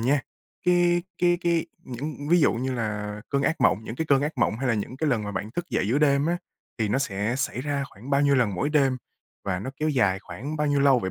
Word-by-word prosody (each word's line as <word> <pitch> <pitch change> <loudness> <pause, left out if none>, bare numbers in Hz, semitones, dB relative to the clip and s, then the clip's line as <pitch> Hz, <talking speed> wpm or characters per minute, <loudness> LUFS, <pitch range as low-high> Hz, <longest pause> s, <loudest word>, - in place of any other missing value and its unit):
nha, 135 +5 +2 0.5
cái 175 -1 +4 0.2
cái 175 0 +3
cái 170 -2 +1 0.2
những 145 +3 -6
ví 175 0 +5
dụ - - +4
như 130 +3 -2
là 105 -2 -3
cơn 140 -1 0
ác 160 - 0
mộng 110 - +3
những 110 - -6
cái 160 - -2
cơn 140 -2 +4
ác 150 +2 -1
mộng 115 -2 +2
hay 130 -1 -1
là 115 - +3
những 110 +5 -4
cái 155 +1 0
lần 115 -4 +1
mà 105 - -4
bạn 105 +2 -4
thức 175 +8 -3
dậy 100 - 0
giữa 130 +6 +2
đêm 140 -1 +3
á, 175 +1 +1 0.4
thì 110 - +1
nó 105 - +1
sẽ 105 -2 -1
xảy 135 -2 -2
ra 145 0 -1
khoảng 120 +8 -11
bao 140 0 +3
nhiêu 140 -1 +4
lần 115 -6 +2
mỗi 90 +11 0
đêm? 135 -4 +3 0.5
Và 95 -2 -1
nó 120 +7 -5
kéo 155 +2 0
dài 100 -10 +2
khoảng 140 +9 -6
bao 150 - 0
nhiêu 145 -1 +2
lâu 140 -2 +5
vậy 95 -5 -3
135 Hz, 265 wpm, -26 LUFS, 110-150 Hz, 0.5 s, ví